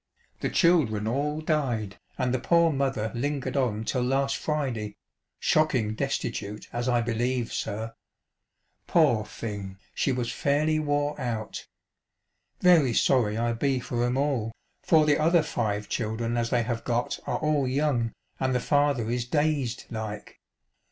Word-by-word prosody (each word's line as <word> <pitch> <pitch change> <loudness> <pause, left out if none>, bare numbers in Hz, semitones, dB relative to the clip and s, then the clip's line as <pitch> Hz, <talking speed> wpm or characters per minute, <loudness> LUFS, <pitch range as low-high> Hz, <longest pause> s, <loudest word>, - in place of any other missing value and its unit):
The - - -1
children 135 - +3
all 145 +6 -1
died, 125 - -1 0.2
and 125 -1 0
the 130 - +1
poor 170 +5 +4
mother 135 -6 -1
lingered 140 +3 -2
on 115 -6 0
till 125 +3 -1
last 135 +2 +1
Friday, 125 -9 -2 0.4
shocking 130 -9 +2
destitute 110 -5 -3
as 120 +1 -1
I 120 -1 +3
believe, 120 +1 -1
sir. 110 +2 -3 0.9
Poor 145 -10 +4
thing, 100 -3 -6 0.2
she 140 - +1
was 125 -2 -1
fairly 155 +2 +1
wore 145 -1 -1
out. 115 -3 -4 0.9
Very 160 -10 +5
sorry 110 -5 +3
I 115 0 +1
be 130 +2 0
for 120 0 -2
'em 125 +1 +1
all; 135 -6 0 0.3
for 155 -2 +4
the 150 0 +3
other 165 +1 +4
five 105 -7 -2
children 115 +1 -2
as 120 -1 0
they 120 -1 +2
have 115 0 -3
got 120 0 -1
are - - 0
all 150 -3 +1
young, 130 -4 +1 0.3
and 130 -1 +1
the - - +3
father 145 -5 +1
is 120 -1 -1
dazed 145 -3 0
like. 110 -2 -6
125 Hz, 145 wpm, -27 LUFS, 115-145 Hz, 0.9 s, Very